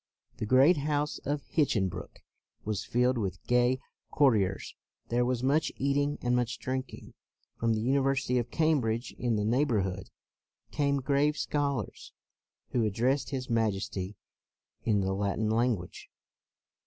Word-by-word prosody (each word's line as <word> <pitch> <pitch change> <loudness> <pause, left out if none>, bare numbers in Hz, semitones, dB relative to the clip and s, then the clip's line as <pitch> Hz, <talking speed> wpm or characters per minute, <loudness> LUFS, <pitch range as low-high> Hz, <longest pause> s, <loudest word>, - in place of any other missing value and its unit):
The 110 - -3
great 135 +8 +6
house 150 +1 -1
of 145 +1 -1
Hinchinbrook 95 - -1 0.4
was 105 -1 -2
filled 125 +1 +1
with 95 -4 -4
gay 125 +1 +3 0.3
cour 140 -2 +5
tiers. 95 -2 -1 0.4
There 120 +1 +2
was 125 0 -1
much 145 +4 +2
eating 145 +2 +1
and 125 0 +2
much 125 -1 0
drinking. 130 0 -5 0.5
From 115 -1 +2
the 110 - -1
University 135 0 +1
of 120 - -3
Cam 155 -3 +2
bridge 115 +2 -2
in 120 -2 +1
the 105 -1 0
neighborhood 105 -7 0 0.6
came 140 -1 +1
grave 145 +3 +2
scholars 140 -7 -2 0.6
who 120 - +1
addressed 120 +7 +1
his 130 -2 -4
Majesty 105 -4 -1 0.7
in 105 -3 +2
the 95 0 0
Latin 100 +2 0
language. 115 -5 -1
125 Hz, 135 wpm, -29 LUFS, 110-140 Hz, 0.7 s, great